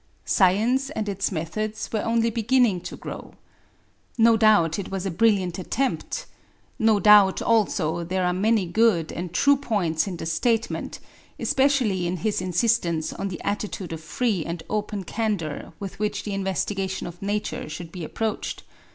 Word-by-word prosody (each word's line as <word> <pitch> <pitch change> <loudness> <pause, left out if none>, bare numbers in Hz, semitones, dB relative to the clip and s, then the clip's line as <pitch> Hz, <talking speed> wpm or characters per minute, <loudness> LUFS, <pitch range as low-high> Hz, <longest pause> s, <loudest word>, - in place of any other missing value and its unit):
Science 225 +8 +3
and 220 -8 -4
its 200 0 -1
methods 210 +6 -3
were 215 - +1
only 230 0 +1
beginning 230 -4 +2
to - - -7
grow. - - -8 0.8
No 230 0 +6
doubt 210 -7 +4
it 195 - -5
was 195 0 -4
a 195 - -1
brilliant 190 -2 +2
attempt. 270 - -2 0.5
No 220 -2 +4
doubt 205 -2 +6
also 175 -7 +1
there 185 +2 -1
are 180 - +1
many 210 +2 +2
good 175 -3 +2
and 175 0 -5
true 285 +10 +4
points 205 - 0
in 180 -3 -4
the - - -6
statement, 225 +8 -1 0.4
especially 255 -10 +2
in 180 +1 -2
his 205 +3 -1
insistence 180 -3 +1
on 200 - -4
the 185 -3 -6
attitude 200 -4 -3
of 160 - -6
free 195 +3 -1
and 170 0 -5
open 210 -2 -2
candour 190 -8 -3
with 195 -1 -7
which 210 0 -1
the 205 - -4
investigation 195 0 -2
of 175 0 -9
Nature 205 -4 -3
should 165 +1 -7
be 180 -2 -7
approached. 220 +7 -3
200 Hz, 160 wpm, -24 LUFS, 175-225 Hz, 0.8 s, No